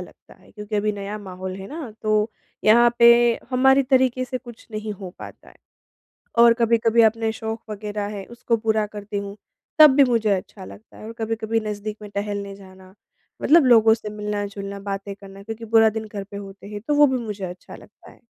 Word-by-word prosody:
लगता - - -14
है - - -21
क्योंकि 210 0 -5
अभी 210 +1 0
नया 205 +1 -6
माहौल 185 -1 -7
है 195 - -8
ना 300 -7 -7
तो 215 +1 +1 0.3
यहाँ 235 +2 +6
पे 235 0 +8 0.4
हमारी 265 +2 +4
तरीके 255 -1 +2
से 255 0 -5
कुछ 240 -3 -14
नहीं 215 0 -5
हो 190 -2 -9
पाता - - -12
है। - - -18 0.8
और 235 0 +8
कभी-कभी 230 -1 +3
अपने 225 0 +2
शौक 225 0 -6
वगैरह 210 0 -4
है 195 - -6
उसको 230 -1 0
पूरा 220 -1 0
करती 205 0 -8
हूँ 200 0 -6 0.4
तब 305 -1 +10
भी 280 - +7
मुझे 230 -4 +1
अच्छा 190 0 -3
लगता 215 +3 -14
है, - - -12
और 225 - -7
कभी-कभी 225 0 -1
नज़दीक 210 0 -5
में 210 - -9
टहलने 200 -1 -4
जाना, 190 -1 -16 0.5
मतलब 325 0 +5
लोगों 225 -2 +6
से 220 -2 -8
मिलना-जुलना 205 -1 -5
बातें 200 0 -5
करना 195 0 -13
क्योंकि 225 +2 -7
पूरा 225 0 +5
दिन 220 0 -5
घर 200 -1 -5
पे 200 +1 -11
होते 195 0 -10
हैं 205 -1 -7
तो 295 - +2
वो 295 0 +6
भी 260 -1 0
मुझे 205 -2 -5
अच्छा 180 0 -9
लगता - - -17
है। - - -20
215 Hz, 200 wpm, -22 LUFS, 200-230 Hz, 0.8 s, तब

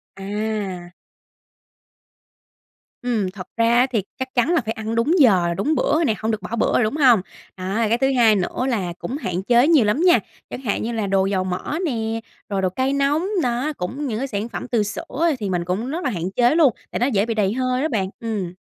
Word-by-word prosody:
À. 195 -3 -4 2.1
Ừm, 220 -6 0
thật 185 -2 -9
ra 230 +1 +3
á, 255 - +4
thì 220 -6 0 0.2
chắc 260 0 -4
chắn 245 +4 +2
là 340 - +3
phải 220 - -1
ăn 220 0 -4
đúng 230 +8 +2
giờ, 185 - +4
đúng 290 +11 +1
bữa - - +1
rồi 325 +1 +2
nè, 225 - +2
hông 220 +1 -1
được 215 -2 -3
bỏ 185 +5 -4
bữa 230 - +1
rồi, - - +3
đúng 215 +6 -1
hông? 250 -9 +5 0.4
Đó, 185 +1 -4
rồi 225 -2 +1
cái 230 - +2
thứ 270 +2 +2
hai 225 -3 +5
nữa 200 +6 -1
là 190 -8 -1
cũng 265 - -4
hạn 185 - -3
chế 240 +5 +4
nhiều 310 -9 +5
lắm 210 +9 +1
nha, 350 - +6 0.3
chẳng - - -6
hạn 220 -6 -1
như 230 - -2
là 220 -3 -2
đồ 195 0 +2
dầu 195 -1 0
mỡ 185 +11 -3
nè, 225 -6 -2 0.3
rồi 200 -2 -1
đồ 185 - +1
cay 260 +8 -1
nóng. 285 +5 +1 0.2
Đó, 250 +5 -1
cũng 270 +11 -4
những 220 -4 -2
cái 270 - -2
sản 210 -1 -3
phẩm - - -6
từ 235 -4 +1
sữa 265 +10 -2
thì 205 -3 -3
mình 175 -2 -1
cũng 195 +8 -2
rất 335 +5 -3
là - - 0
hạn 180 -4 -3
chế 245 +7 +3
luôn, 300 -8 +5 0.2
tại - - -2
nó 245 - +2
dễ 215 -6 +1
bị 230 - -1
đầy 205 -2 +1
hơi 255 +1 0
đó 310 - +1
bạn. 205 -10 -1
Ừm. 210 -6 -3
225 Hz, 240 wpm, -21 LUFS, 195-260 Hz, 2.1 s, nha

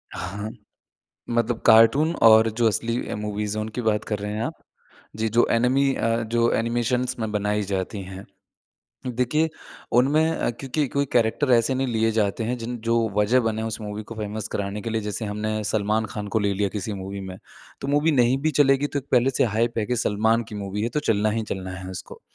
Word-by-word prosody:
हाँ, 100 +4 -5 0.8
मतलब 120 0 0
कार्टून 115 +9 +6
और 110 0 +7
जो 115 - +3
असली 115 +2 -1
अ, - - -3
मूवीज़ 105 0 -3
है 110 - -1
उनकी 110 +3 -4
बात 105 -1 +1
कर 105 - -2
रहे 105 +1 -4
हैं 110 - -2
आप? - - -4 0.6
जी, 110 +1 0
जो 115 +2 +3
एनीमे 130 +4 +3
अ, 115 0 0
जो 115 +1 +1
एनिमेशन्स 120 +2 0
में 110 - -2
बनाई 105 0 0
जाती 95 +1 -3
है। 95 +1 -9 0.8
देखिए, 125 +6 +1 0.4
उनमें 145 +7 +3
अ, - - 0
क्योंकि 135 +4 -2
कोई 140 +3 0
कैरेक्टर 120 +4 +2
ऐसे 120 +2 +3
नहीं 135 +1 0
लिए 115 -1 +1
जाते 110 +1 0
हैं 125 +2 -1
जिन 120 +2 -4
जो 115 0 +2 0.2
वजह 110 +5 +4
बने 110 -2 -1
हैं 110 - -2
उस 110 - -5
मूवी 105 0 -5
को - - -5
फ़ेमस 110 0 -5
कराने 100 +1 -3
के 115 - -4
लिए, 110 0 0
जैसे 105 +1 -4
हमने 105 +1 -2
सलमान 110 +1 0
खान 105 -2 -4
को - - +6
ले 100 -2 +1
लिया 100 +1 0
किसी 105 +1 -4
मूवी 100 +1 -6
में, 95 -1 -7 0.4
तो 140 - -4
मूवी 145 +3 +3
नहीं 120 +3 +3
भी 155 - +2
चलेगी 135 0 +4
तो 145 - -3
पहले 125 +1 +4
से 130 - +2
हाइप 115 +1 +1
है 105 - 0
कि 125 - -1
सलमान 110 +1 +2
की - - -8
मूवी 100 0 -4
है, 115 - 0
तो 135 +6 -2
चलना 110 -4 +1
ही 110 +1 -1
चलना 95 -1 -5
है 95 0 -7
उसको। 95 - -9
110 Hz, 210 wpm, -24 LUFS, 105-120 Hz, 0.8 s, और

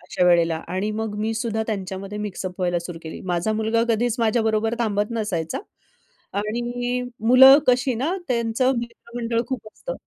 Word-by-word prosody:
अशा 180 - -1
वेळेला 170 -2 +4
आणि 190 +4 -1
मग 220 -2 -3
मी 220 +1 -1
सुद्धा 220 -1 -1
त्यांच्यामध्ये 195 -1 -4
मिक्सअप 190 -2 -5
व्हायला 175 -1 +1
सुरू 175 -2 -7
केली. 160 - -7
माझा 180 +3 -1
मुलगा 220 +1 +1
कधीच 230 +1 +1
माझ्याबरोबर 225 -1 +1
थांबत 210 -2 0
नसायचा 205 -8 -2 0.8
आणि 240 +4 -2 0.3
मुलं 265 +2 +10
कशी 250 +1 +3
ना 290 +11 -1
त्यांचं 235 +1 +1
मित्रमंडळ 235 0 -3
खूप 255 -5 -5
असतं. - - -6
220 Hz, 150 wpm, -23 LUFS, 195-240 Hz, 0.8 s, मुलं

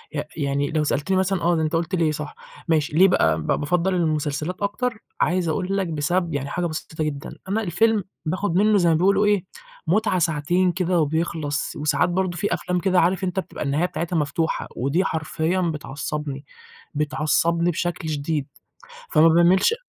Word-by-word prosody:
ي 145 - -1
يعني 140 -1 -1
لو 155 -1 +1
سألتني 150 +6 0
مثلًا 190 -1 +1
آه، 175 +1 +2
ده 160 - 0
أنت 155 +1 -1
قُلت 170 +3 -1
ليه 165 -3 +2
صح، 150 -1 -6 0.3
ماشي، 155 -3 +1
ليه 190 - +8
بقى 80 - +3
ب - - -7
بافَضّل 180 +5 +1
المسلسلات 155 +1 -1
أكتر؟ 220 +3 -1 0.2
عايز 175 -1 +1
أقول 190 +4 -1
لك 190 - 0
بسبب 165 +2 -1
يعني 140 -1 -2
حاجة 175 +3 -2
بسيطة 155 -1 -4
جدًا، 145 -2 -4
أنا 220 +3 +1
الفيلم 210 +4 +2 0.2
باخد 180 +2 -1
منه 210 +2 +4
زي 175 -3 +3
ما 165 - +4
بيقولوا 195 +5 +3
إيه 205 -3 +2 0.4
متعة 190 +1 +2
ساعتين 170 +3 +1
كده 180 0 0
وبيخلص 155 -1 -1
وساعات 145 +2 +1
برضه 180 0 -1
فيه 205 - 0
أفلام 180 0 -1
كده 185 0 +2
عارف 180 +2 +2
أنت 185 0 -1
بتبقى 190 - -5
النهاية 145 +4 +1
بتاعتها 175 -1 -3
مفتوحة، 155 +2 -1
ودي 140 +9 +1
حرفيًا 160 +2 -1
بتعصبني، 150 -3 -4 0.5
بتعصبني 155 +3 +1
بشكل 175 0 -3
شديد، 145 -1 -2 0.6
فما 155 +2 +6
باميلش 175 - +4
170 Hz, 170 wpm, -23 LUFS, 150-185 Hz, 0.6 s, ليه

